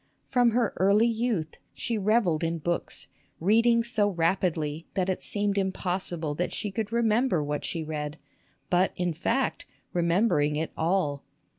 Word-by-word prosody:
From 245 -2 +3
her 235 -1 +1
early 200 +4 +4
youth 225 -8 -1 0.2
she 235 - -2
revelled 205 -6 +2
in 165 0 0
books, 170 +2 -2 0.3
reading 230 +6 +4
so 220 -3 +1
rapidly 165 -3 0
that 190 -1 0
it 185 - -1
seemed 205 -1 0
impossible 180 -4 -2
that 175 +4 -2
she 205 - -3
could 210 +1 -3
remember 230 - +2
what 145 0 -3
she 165 -2 -3
read; 150 -1 -4 0.5
but, 180 +1 +3
in 180 -2 -1
fact, 230 - -1 0.3
remembering 170 -3 +2
it 155 +1 -2
all 160 -5 0
185 Hz, 145 wpm, -27 LUFS, 165-220 Hz, 0.5 s, early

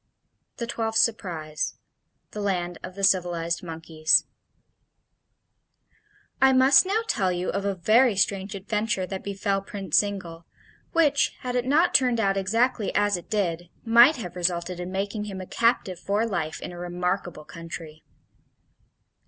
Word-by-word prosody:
The 235 - -3
Twelfth 225 -1 -2
Surprise 165 -10 -1 0.6
THE 210 - -6
LAND 175 -4 -2
OF 185 - -9
THE 200 - -6
CIVILIZED 170 -3 +1
MONKEYS 160 -2 +1 2.2
I 265 0 +6
must 265 +6 +6
now 420 +3 +1
tell 190 - +1
you 180 +1 -2
of 200 0 -3
a 200 -1 -1
very 220 +6 +3
strange 195 +1 0
adventure 210 0 -2
that 190 0 -6
befell 200 0 -2
Prince 195 -4 0
Zingle, 180 -5 -5 0.4
which, 295 -4 +2
had 250 -1 -4
it 245 0 -1
not 325 +6 +3
turned 250 -3 +3
out 195 -3 +1
exactly 225 +3 0
as 205 -1 +2
it 175 - -8
did, 175 -5 -2 0.2
might 235 +6 +7
have 180 -8 -7
resulted 175 0 -1
in 180 +1 -5
making 200 +2 -3
him 195 -2 -6
a 185 - -6
captive 230 -5 0
for 205 +4 0
life 170 -8 -3
in - - -6
a 175 - -9
remarkable 175 -2 -3
country. 165 -2 -9
195 Hz, 145 wpm, -25 LUFS, 175-225 Hz, 2.2 s, might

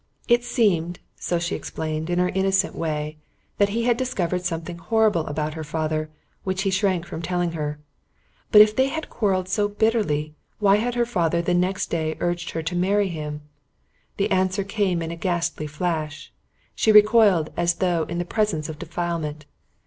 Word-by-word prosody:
It 240 0 +4
seemed, 185 -8 +1 0.2
so 175 - -1
she 170 0 -2
explained, 155 +1 -4
in 175 - 0
her 180 0 +2
innocent 190 +1 +1
way, 155 -1 -3 0.4
that 200 0 +4
he 230 +3 -1
had 240 -1 +2
discovered 180 -8 -1
something 170 0 -4
horrible 210 -2 +2
about 150 +1 -2
her 160 0 -5
father 155 0 -2 0.3
which 190 0 -1
he 195 - +1
shrank 185 -3 +1
from 160 - -6
telling 175 0 -1
her. 150 -2 -4 0.7
But 210 - +10
if 215 0 -1
they 260 +1 +3
had 320 +3 -5
quarrelled 190 -5 0
so 205 +2 +1
bitterly, 205 -9 0 0.2
why 200 -1 +4
had 240 +3 -1
her 240 -1 +2
father 170 -7 0
the 175 +1 0
very 175 - +3
next 185 +1 -1
day 160 -2 -1
urged 175 0 -1
her 160 - -4
to 175 +3 -3
marry 195 +3 +2
him? 150 -3 -5 0.8
The 200 - 0
answer 190 +1 +1
came 195 -4 0
in 165 - -4
a - - -4
ghastly 170 -3 -2
flash. 155 -1 -3 0.4
She 220 - +3
recoiled 210 -6 +5
as 175 0 +1
though 170 -3 +1
in 170 - -3
the 175 - -1
presence 175 -7 -1
of 155 -1 -7
defilement. 160 -3 -3
175 Hz, 180 wpm, -24 LUFS, 160-200 Hz, 0.8 s, But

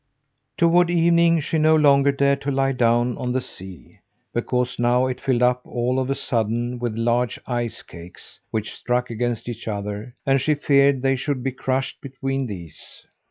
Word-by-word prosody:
Toward 175 +1 +4
evening 170 -1 +4
she 160 +2 -1
no 155 +1 +5
longer 140 -2 +5
dared 140 0 +1
to 140 - -3
lie 135 0 +1
down 120 -1 +2
on 125 - -2
the 130 - +1
sea, 95 -7 -9 0.3
because 125 +1 -1
now 120 +1 +3
it 130 -1 -3
filled 125 -2 +1
up 125 0 +3
all 125 +2 -1
of 130 0 -2
a 135 - +1
sudden 120 0 -1
with 120 -2 -3
large 120 0 +1
ice 120 -2 -3
cakes, 85 +1 -11
which 110 -1 -3
struck 125 0 -1
against 120 0 -2
each 120 -1 -6
other, 105 +3 -5
and 135 -1 +3
she 150 +3 +2
feared 140 -2 +3
they 135 0 +3
should 130 0 -3
be 135 - -1
crushed 130 +1 -2
between 135 -1 -3
these. 85 -7 -8
125 Hz, 175 wpm, -22 LUFS, 120-140 Hz, 0.3 s, no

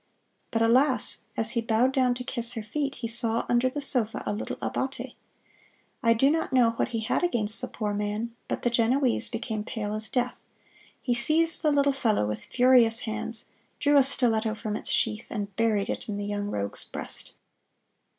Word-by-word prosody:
But, 225 -1 +1
alas! 255 +2 +2
as 225 0 +1
he 235 -2 0
bowed 230 +3 +2
down 255 -2 +2
to 250 - -6
kiss 235 -1 -2
her 225 -3 -5
feet, 275 +5 -3
he 235 - -4
saw 230 0 0
under 245 +1 +2
the 290 +3 -5
sofa 245 -5 -1
a - - -1
little 210 - -4
abbate! - - -3 0.9
I 230 -2 +4
do 270 +5 +4
not 320 -3 -1
know 245 -3 +4
what 230 - -1
he 230 -2 -3
had 230 +9 0
against 230 -10 +2
the - - -2
poor 210 -2 -3
man, 210 +3 -3
but - - -3
the 240 - +1
Genoese 240 +2 +2
became 225 -2 -4
pale 210 -3 -4
as 215 0 -3
death. 250 -1 -1 0.6
He 245 - +1
seized 310 +7 +3
the 305 -2 +2
little 280 -1 +3
fellow 220 - +1
with 105 0 -4
furious 245 -3 +4
hands, 225 +1 -5 0.3
drew 290 0 +2
a 280 - +8
stiletto 225 -5 +2
from 215 -1 -4
its 250 - -4
sheath, 225 -4 0
and 200 -3 -5
buried 220 -3 +1
it - - -4
in 205 - -3
the 205 - -3
young 205 0 -3
rogue's 100 - -4
breast. - - -6
230 Hz, 190 wpm, -27 LUFS, 220-255 Hz, 0.9 s, a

